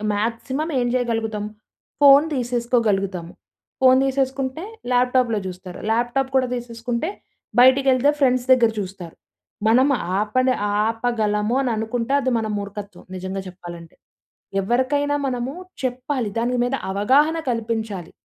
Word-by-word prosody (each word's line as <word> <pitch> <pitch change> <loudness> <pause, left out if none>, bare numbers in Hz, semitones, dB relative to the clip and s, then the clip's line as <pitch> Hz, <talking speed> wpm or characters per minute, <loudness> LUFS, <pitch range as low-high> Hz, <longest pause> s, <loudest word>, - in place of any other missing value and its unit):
Maximum 235 +8 -2
ఏం 245 - +1
చేయగలుగుతాం 225 -4 -1 0.6
phone 280 +2 +8
తీసేసుకోగలుగుతాము. 230 -8 -1 0.5
Phone 260 0 +6
తీసేసుకుంటే, 270 +3 -1 0.3
ల్యాప్‌టాప్‌లో 250 -3 +2
చూస్తారు. 180 0 -8
ల్యాప్‌టాప్‌ 240 +4 0
కూడా 255 -1 +3
తీసేసుకుంటే, 235 +4 -4 0.5
బయటికేళ్తే 260 +1 +5
ఫ్రెండ్స్ 255 -2 +2
దగ్గర 235 -3 +4
చూస్తారు. 185 -3 -7 0.5
మనం 255 +5 +5 0.3
ఆప‌నే 255 +5 +1 0.3
ఆపగలము 225 -1 0
అని 255 -3 0
అనుకుంటే 230 +4 -2
అది 260 -1 0
మన 220 -1 -2
మూర్ఖత్వం 200 0 -8
నిజంగా 190 +1 -4
చెప్పాలంటే. 175 -2 -10 0.7
ఎవరికైనా 265 +7 +1
మనము 250 +1 -3 0.3
చెప్పాలి. 255 -2 -2
దాని 240 +2 0
మీద 245 +2 0 0.2
అవగాహన 270 +11 +3
కల్పించాలి. 225 -6 -3
240 Hz, 110 wpm, -22 LUFS, 210-260 Hz, 0.7 s, phone